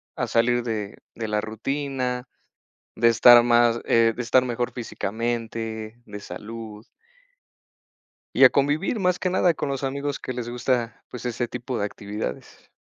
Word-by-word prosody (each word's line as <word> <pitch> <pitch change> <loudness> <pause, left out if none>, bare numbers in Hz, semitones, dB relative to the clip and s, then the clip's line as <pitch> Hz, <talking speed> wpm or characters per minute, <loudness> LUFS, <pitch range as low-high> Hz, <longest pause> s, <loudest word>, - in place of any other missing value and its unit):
a - - -2
salir 120 +1 +2
de 110 -3 -4 0.2
de 115 - -4
la 105 0 0
rutina, 125 +2 -3 0.7
de 115 - +4
estar 120 +1 +8
más 120 -1 +4
eh, 115 -1 +4
de 125 - -3
estar 125 +2 +3
mejor 120 -1 -2
físicamente, 115 -1 -4
de 105 -1 -8
salud. 110 +1 -8 1.5
Y - - +5
a - - +10
convivir 150 - 0
más 180 -1 +1
que 185 - 0
nada 180 -1 +3
con 150 - -3
los 135 0 -3
amigos 140 +1 -2
que 130 - -5
les 120 -1 -5
gusta 120 -1 -1
pues 125 - -8
ese 120 0 -2
tipo 125 0 -5
de 100 - 0
actividades. 105 +1 -7
120 Hz, 155 wpm, -24 LUFS, 115-130 Hz, 1.5 s, a